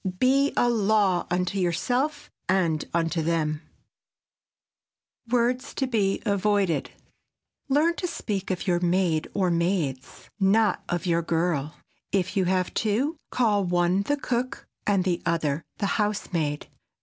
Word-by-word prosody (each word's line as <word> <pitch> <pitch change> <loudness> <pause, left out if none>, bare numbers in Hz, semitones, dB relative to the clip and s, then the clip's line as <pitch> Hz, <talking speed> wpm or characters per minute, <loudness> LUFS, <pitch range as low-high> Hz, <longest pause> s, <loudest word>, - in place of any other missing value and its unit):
Be 275 +5 +3
a 245 - +4
law 210 -5 +2
unto 180 +2 0
yourself 245 - -1 0.2
and 170 -5 +2
unto 165 0 0
them. 155 -2 0 1.6
[Sidenote: 230 - -18
WORDS 250 +1 +1
TO 270 - 0
BE 210 -6 0
AVOIDED] 200 - +1 0.8
Learn 310 +5 +3
to 360 - -2
speak 205 - -4
of 185 -2 -2
your 175 -3 +2
"maid" 175 -2 +1
or 185 -3 +2
"maids," 170 -7 -2
not 200 +1 +3
of 175 +1 -1
your 170 -1 +2
"girl." 160 -3 -1 0.4
If 190 0 0
you 190 -2 +2
have 185 0 0
two, 235 +9 0
call 215 -5 +2
one 175 +1 +2
the 290 +8 0
cook 255 -2 -3 0.2
and 200 -3 +3
the 175 -2 0
other 160 -3 0 0.2
the 205 - -1 0.2
housemaid. 170 -8 -1
190 Hz, 135 wpm, -26 LUFS, 170-220 Hz, 1.6 s, a